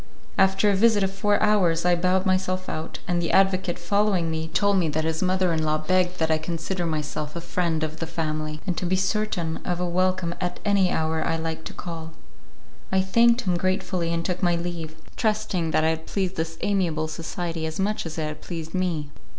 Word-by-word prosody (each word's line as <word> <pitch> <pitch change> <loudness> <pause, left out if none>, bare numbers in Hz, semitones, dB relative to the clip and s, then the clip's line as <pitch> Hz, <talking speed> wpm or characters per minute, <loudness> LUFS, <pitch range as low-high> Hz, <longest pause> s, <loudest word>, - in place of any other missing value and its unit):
After 195 +2 +4
a - - +2
visit 210 0 +4
of 195 0 -1
four 205 +1 +2
hours 180 -6 +3
I 180 - +5
bowed 185 +2 +2
myself 185 0 0
out, 155 +1 -4
and 175 -1 +1
the 170 - -1
advocate, 190 -2 +3
following 185 -1 +1
me, 160 0 -2
told 200 +4 +2
me 170 -4 +2
that 155 +1 -1
his 160 0 -1
mother 185 -1 +2
in 160 - 0
law 155 0 +2
begged 180 +3 +1
me 160 - +3
to 160 -1 +1
consider 170 +2 -3
myself 150 0 -3
as 170 - -6
a - - -14
friend 170 -3 0
of 155 0 -3
the 165 - -3
family, 155 -2 -3
and 180 - -1
to 180 - -1
be 185 - +2
certain 190 -4 0
of 175 -1 -3
a 180 - 0
welcome 185 0 +1
at 180 -1 -2
any 200 -3 +3
hour 160 -1 0
I 165 - 0
liked 160 0 -4
to - - -6
call. 165 -2 -7 0.8
I 190 0 +3
thanked 235 +5 +4
him 180 -3 0
gratefully 185 -1 0
and 170 0 -1
took 180 0 -2
my 175 -2 +3
leave, 170 -2 -4 0.2
trusting 215 -7 0
that 155 - +2
I 160 - +4
had 160 0 -3
pleased 190 -2 -1
this 165 0 -3
amiable 170 -6 +1
society 165 +1 -4
as 160 +2 -5
much 205 -2 0
as 160 - -7
it 160 - -1
had 155 0 -6
pleased 165 -2 -6
me. 170 -6 -1
175 Hz, 215 wpm, -25 LUFS, 160-190 Hz, 0.8 s, I